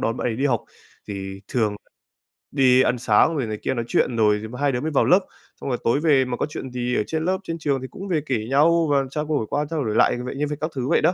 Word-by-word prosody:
đón 115 - -1
bạn - - -2
ấy 110 - -3
đi 140 +4 +1
học. 120 -5 0 0.4
Thì 95 -1 -6
thường 110 -4 0 0.8
đi 130 -2 +5
ăn 125 - +2
sáng 120 +7 +3
rồi 135 -6 -1
này 110 -1 -4
kia, - - 0
nói 120 -2 -3
chuyện 120 - +1
rồi 105 -1 +2 0.2
hai 145 -1 +2
đứa 125 0 -2
mới 160 - -2
vào 145 - +3
lớp. 180 - +6 0.4
Xong - - -4
rồi 125 - 0
tối 120 +5 +2
về 145 -5 +3
mà 125 -1 -3
có - - 0
chuyện 130 -3 -6
gì 125 0 -2
ở - - +1
trên 160 0 -2
lớp, 185 +1 +1
trên 165 -1 -4
trường 140 -3 0
thì 130 - -5
cũng 195 - -8
về 165 -5 0
kể 135 - 0
nhau 165 +4 +4
và 140 -1 +3
trao 150 +2 -3
đổi 150 -7 -1
qua 145 +1 0
trao 155 -5 -2
đổi 110 -1 -1
lại - - +4
vậy 125 - -5
như 145 +2 -1
vậy 150 - -3
các 155 +1 -2
thứ 130 -1 -2
vậy - - +3
đó. 180 - +3
135 Hz, 285 wpm, -23 LUFS, 120-150 Hz, 0.8 s, lớp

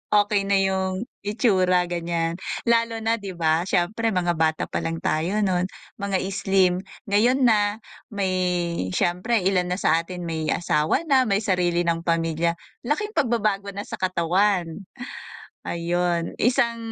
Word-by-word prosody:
okey 205 -1 +2
na 200 - +3
yung 190 +1 -1 0.2
itsura 190 -5 +3
ganyan. 170 0 -2 0.2
Lalo 230 -1 +1
na 225 +1 +1
'di 195 -3 -7
ba 165 +1 +1
siyempre 215 +5 0
mga 175 -1 +1
bata 160 -1 +1
pa - - -3
lang 165 0 -4
tayo 180 +7 0
no'n, 185 -2 +1 0.3
mga 200 -1 0
slim. 190 -2 +2 0.3
Ngayon 245 +6 +3
na 210 -2 +2 0.2
may, 200 -3 -2 0.6
siyempre 185 +5 +1
ilan 180 -1 +2
na 180 - -1
sa 165 -3 +2
atin 180 +1 -6
may 160 -2 -3
asawa 155 - +1
na, 270 -6 +3
may 200 +1 +1
sarili 175 -3 +1
ng 170 -1 0
pamilya, 165 0 +1 0.3
laking 420 +8 -1
pagbabago 210 - 0
na 200 - -4
sa - - -8
katawan. 185 0 0 0.8
Ayun, 170 0 -1
isang, 235 0 +2
185 Hz, 140 wpm, -24 LUFS, 170-210 Hz, 0.8 s, na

